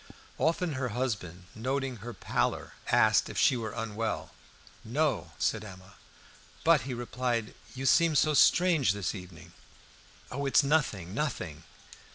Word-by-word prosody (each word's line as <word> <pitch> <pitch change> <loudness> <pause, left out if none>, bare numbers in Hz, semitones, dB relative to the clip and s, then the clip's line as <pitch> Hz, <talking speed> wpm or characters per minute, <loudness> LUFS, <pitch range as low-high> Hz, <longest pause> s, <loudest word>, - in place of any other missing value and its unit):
Often 165 0 +1
her 130 -2 -2
husband, 100 -9 -3
noting 130 +2 -2
her 115 +3 -7
pallor, 105 - -2
asked - - +4
if - - -7
she - - +4
were 115 -2 -3
unwell. 115 -1 -3 0.5
"No," 145 +5 -1
said 110 -1 0
Emma. 95 -2 -12 0.7
"But," 165 -4 +5
he - - -2
replied, 120 -2 -2 0.2
"you 135 +1 -4
seem 165 +3 +4
so 155 +1 +4
strange 165 - +4
this 100 -2 -2
evening." 90 -4 -11 0.8
"Oh, 140 +2 -2
it's 135 - +5
nothing! 125 - 0
nothing!" 110 - -3
125 Hz, 135 wpm, -29 LUFS, 105-140 Hz, 0.8 s, But